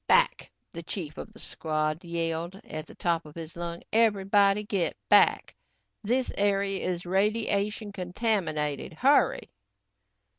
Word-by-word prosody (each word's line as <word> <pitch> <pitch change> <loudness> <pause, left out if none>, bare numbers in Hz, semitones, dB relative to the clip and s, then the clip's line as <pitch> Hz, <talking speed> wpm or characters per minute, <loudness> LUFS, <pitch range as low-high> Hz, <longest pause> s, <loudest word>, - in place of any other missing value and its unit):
"Back," - - +3 0.2
the 170 - -5
chief 165 -3 -6
of - - -8
the 225 - -16
squad 155 +1 -2
yelled 170 +2 -3
at 155 0 -6
the - - -13
top 170 -1 0
of 150 -1 -14
his 165 -1 -8
lungs. 170 0 -5
"Everybody 205 -2 +3
get 200 -5 -1
back. - - +4 0.5
This 245 +4 0
area 200 -1 +1
is 180 -1 -3
radiation 205 +2 0
contaminated. 180 - -1
Hurry!" - - +2
190 Hz, 125 wpm, -28 LUFS, 165-205 Hz, 0.5 s, back